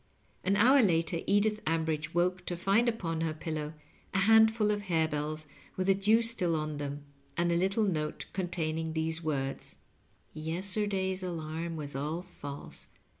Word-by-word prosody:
An 195 Hz, +2 st, +2 dB
hour 255 Hz, +7 st, +6 dB
later 165 Hz, -4 st, +2 dB
Edith 210 Hz, +1 st, +2 dB
Ambridge 160 Hz, -1 st, 0 dB
woke 180 Hz, +1 st, +1 dB
to 175 Hz, -, -2 dB
find 200 Hz, +7 st, +3 dB
upon 165 Hz, -8 st, -2 dB
her 160 Hz, -1 st, -1 dB
pillow 155 Hz, -1 st, -4 dB, 0.4 s
a 190 Hz, -, +3 dB
handful 220 Hz, 0 st, +5 dB
of 205 Hz, 0 st, -1 dB
harebells 155 Hz, -2 st, 0 dB, 0.3 s
with 185 Hz, -, 0 dB
the 195 Hz, -, +5 dB
dew 210 Hz, +4 st, +3 dB
still 195 Hz, -8 st, +2 dB
on 155 Hz, -1 st, -2 dB
them, 145 Hz, 0 st, -4 dB, 0.3 s
and 170 Hz, 0 st, +2 dB
a -, -, +2 dB
little 195 Hz, +5 st, +2 dB
note 155 Hz, -5 st, -2 dB
containing 160 Hz, -3 st, -2 dB
these 160 Hz, +1 st, -1 dB
words: 135 Hz, -3 st, -3 dB, 0.3 s
" -, -, -37 dB, 0.2 s
Yesterday's 190 Hz, +4 st, -1 dB
alarm 165 Hz, -1 st, -4 dB
was 145 Hz, -3 st, -6 dB
all 155 Hz, +5 st, -2 dB
false. 145 Hz, -6 st, -8 dB
170 Hz, 155 wpm, -31 LUFS, 155-195 Hz, 0.4 s, hour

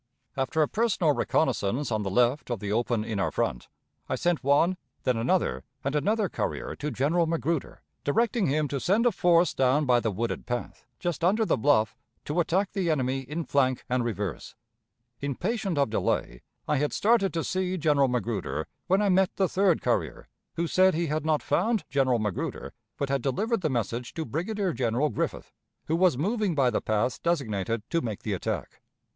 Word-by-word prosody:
After 135 Hz, +4 st, +1 dB
a -, -, +1 dB
personal 200 Hz, -8 st, +1 dB
reconnaissance 125 Hz, -2 st, 0 dB
on 110 Hz, -1 st, 0 dB
the 100 Hz, -, -2 dB
left 125 Hz, +8 st, +2 dB
of 120 Hz, -4 st, -2 dB
the 100 Hz, 0 st, -4 dB
open 115 Hz, 0 st, 0 dB
in 110 Hz, -3 st, -3 dB
our 95 Hz, -, +1 dB
front, -, -, -2 dB, 0.4 s
I -, -, 0 dB
sent 175 Hz, -2 st, 0 dB
one, 145 Hz, +7 st, +3 dB, 0.3 s
then 125 Hz, -, +2 dB
another, 65 Hz, -, 0 dB, 0.2 s
and 140 Hz, +2 st, -1 dB
another 210 Hz, +7 st, +1 dB
courier -, -, -3 dB
to 150 Hz, -, -3 dB
General 150 Hz, +6 st, +1 dB
Magruder, 165 Hz, -2 st, -2 dB, 0.2 s
directing 225 Hz, +5 st, +1 dB
him 150 Hz, +2 st, +1 dB
to 140 Hz, -, -2 dB
send 205 Hz, -, +2 dB
a 240 Hz, -, +5 dB
force 175 Hz, -2 st, +3 dB
down 135 Hz, +3 st, +2 dB
by 125 Hz, -2 st, +4 dB
the 115 Hz, -, -1 dB
wooded 110 Hz, +4 st, -3 dB
path, 120 Hz, 0 st, -5 dB
just 175 Hz, -2 st, -3 dB
under 210 Hz, +6 st, +3 dB
the -, -, +2 dB
bluff, 110 Hz, -3 st, +2 dB, 0.3 s
to 150 Hz, +4 st, -1 dB
attack 185 Hz, +4 st, +1 dB
the 190 Hz, -4 st, -1 dB
enemy 135 Hz, -3 st, +1 dB
in 150 Hz, +6 st, -4 dB
flank 130 Hz, -2 st, +1 dB
and 125 Hz, -1 st, 0 dB
reverse. 105 Hz, -7 st, -4 dB, 0.6 s
Impatient 180 Hz, -, -2 dB
of 140 Hz, -6 st, +2 dB
delay, -, -, -1 dB, 0.3 s
I 150 Hz, -, +2 dB
had 145 Hz, +2 st, 0 dB
started 215 Hz, -3 st, +3 dB
to 165 Hz, -, 0 dB
see 185 Hz, 0 st, -1 dB
General 145 Hz, -4 st, +3 dB
Magruder, 115 Hz, -6 st, -2 dB, 0.2 s
when 195 Hz, +3 st, +3 dB
I 205 Hz, -, +2 dB
met 190 Hz, 0 st, +3 dB
the 190 Hz, -, +2 dB
third 185 Hz, -2 st, +2 dB
courier, -, -, -1 dB, 0.3 s
who 170 Hz, -, 0 dB
said 185 Hz, +1 st, +4 dB
he 170 Hz, +1 st, 0 dB
had 155 Hz, 0 st, -2 dB
not 155 Hz, -2 st, +1 dB
found 225 Hz, -2 st, +1 dB
General 130 Hz, -3 st, +2 dB
Magruder, 105 Hz, -4 st, -3 dB, 0.2 s
but 140 Hz, -, -2 dB
had 140 Hz, -1 st, 0 dB
delivered 210 Hz, -, 0 dB
the 155 Hz, -, 0 dB
message 120 Hz, -1 st, -3 dB
to 160 Hz, -, -3 dB
Brigadier 185 Hz, +4 st, -2 dB
General 125 Hz, +4 st, +1 dB
Griffith, -, -, -3 dB, 0.3 s
who 160 Hz, -, 0 dB
was 175 Hz, -5 st, +3 dB
moving 200 Hz, -, 0 dB
by 130 Hz, -4 st, +3 dB
the -, -, 0 dB
path 110 Hz, +3 st, 0 dB
designated 115 Hz, -, -1 dB
to 170 Hz, -, +2 dB
make 110 Hz, -4 st, -5 dB
the 105 Hz, -, -2 dB
attack. 95 Hz, -, -4 dB
145 Hz, 185 wpm, -27 LUFS, 120-180 Hz, 0.6 s, a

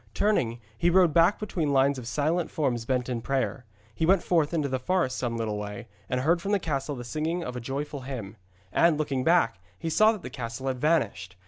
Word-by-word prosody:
Turning, 125 Hz, -, +1 dB, 0.2 s
he 170 Hz, +10 st, +2 dB
rode 175 Hz, -3 st, +4 dB
back 170 Hz, +5 st, +5 dB
between 170 Hz, -8 st, -2 dB
lines 135 Hz, 0 st, +3 dB
of 120 Hz, -, -8 dB
silent 155 Hz, +6 st, 0 dB
forms 120 Hz, -7 st, -1 dB
bent 125 Hz, 0 st, 0 dB
in 120 Hz, -2 st, -2 dB
prayer. 135 Hz, 0 st, -2 dB, 0.3 s
He 135 Hz, -, -3 dB
went 180 Hz, +2 st, +4 dB
forth 160 Hz, -4 st, +2 dB
into 155 Hz, -4 st, 0 dB
the 130 Hz, -1 st, -2 dB
forest 130 Hz, -2 st, 0 dB
some 120 Hz, -2 st, -2 dB
little 110 Hz, -2 st, -2 dB
way, 105 Hz, +2 st, -6 dB, 0.2 s
and 125 Hz, 0 st, 0 dB
heard 170 Hz, +5 st, +2 dB
from 200 Hz, +2 st, -1 dB
the -, -, +5 dB
castle 145 Hz, -4 st, -2 dB
the 120 Hz, -, -6 dB
singing 155 Hz, +8 st, -2 dB
of 125 Hz, -5 st, -5 dB
a -, -, -3 dB
joyful 140 Hz, +4 st, -4 dB
hymn. 120 Hz, -6 st, -6 dB, 0.4 s
And, 165 Hz, -, +4 dB
looking 140 Hz, -4 st, -1 dB
back, 160 Hz, -, +3 dB, 0.2 s
he 165 Hz, -, -3 dB
saw 215 Hz, +7 st, +5 dB
that 215 Hz, -4 st, -6 dB
the -, -, -7 dB
castle 115 Hz, +1 st, -6 dB
had 130 Hz, -1 st, -4 dB
vanished. 110 Hz, -, 0 dB
140 Hz, 220 wpm, -27 LUFS, 120-165 Hz, 0.4 s, back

